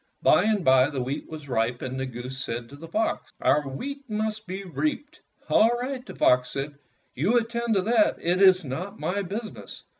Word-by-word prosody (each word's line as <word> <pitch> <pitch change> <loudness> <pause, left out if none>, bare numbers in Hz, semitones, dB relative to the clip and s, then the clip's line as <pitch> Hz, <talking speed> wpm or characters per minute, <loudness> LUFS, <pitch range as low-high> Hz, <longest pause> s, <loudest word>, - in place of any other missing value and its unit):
By - - +5
and 210 -4 +1
by 130 +1 +5
the 135 -4 -3
wheat 135 +3 -4
was 155 -2 -8
ripe, 120 -1 -1
and 130 +1 -4
the 130 - -2
goose 125 +1 -6
said 115 0 -5
to 140 - -11
the 165 +3 -10
fox, 220 +7 -1
"Our 145 -1 +2
wheat 275 - -6
must 215 0 -2
be 190 +2 -5
reaped." 165 - -3 0.3
"All 225 - +5
right," 255 0 -4
the - - -10
fox 125 0 +3
said, 140 +3 -3 0.4
"you 190 - +2
attend 235 -1 0
to 190 - +2
that. 225 +1 +3
It 180 +3 +1
is 190 -3 +6
not 180 +11 -5
my 200 +3 -1
business." 210 +4 -7
180 Hz, 200 wpm, -26 LUFS, 130-220 Hz, 0.4 s, is